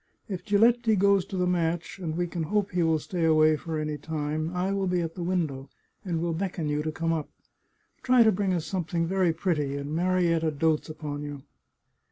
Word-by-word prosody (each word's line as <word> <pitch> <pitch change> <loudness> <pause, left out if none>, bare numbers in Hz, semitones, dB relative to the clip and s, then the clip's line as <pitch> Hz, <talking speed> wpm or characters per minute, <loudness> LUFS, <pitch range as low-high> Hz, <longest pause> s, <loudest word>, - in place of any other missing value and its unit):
If 190 -5 -5
Giletti 225 +2 +3
goes 200 -1 +3
to 190 - -6
the 180 - +1
match, 170 0 -1
and 165 -3 -3
we 175 - +1
can 175 -1 -4
hope 205 +5 0
he 180 -1 0
will 160 -1 +3
stay 170 +3 -3
away 155 -1 +5
for 160 +1 -4
any 150 -1 -3
time, 155 +1 -2
I 180 +2 -1
will 195 -1 0
be 180 -1 +1
at 165 -1 -3
the 180 - -7
window, 160 -7 -2 0.3
and 175 -5 -2
will 170 0 -1
beckon 170 -2 -3
you 150 0 0
to 155 +1 -2
come 165 +1 -1
up. 155 -2 -3 0.7
Try 250 -2 +5
to 220 - +5
bring 195 -1 0
us 170 -3 -1
something 170 -2 -1
very 185 0 +2
pretty. 155 -5 -1
And 140 +1 -5
Marietta 170 -2 +2
dotes 155 +2 +1
upon 150 -2 -5
you." 145 -2 -7
170 Hz, 210 wpm, -27 LUFS, 155-185 Hz, 0.7 s, away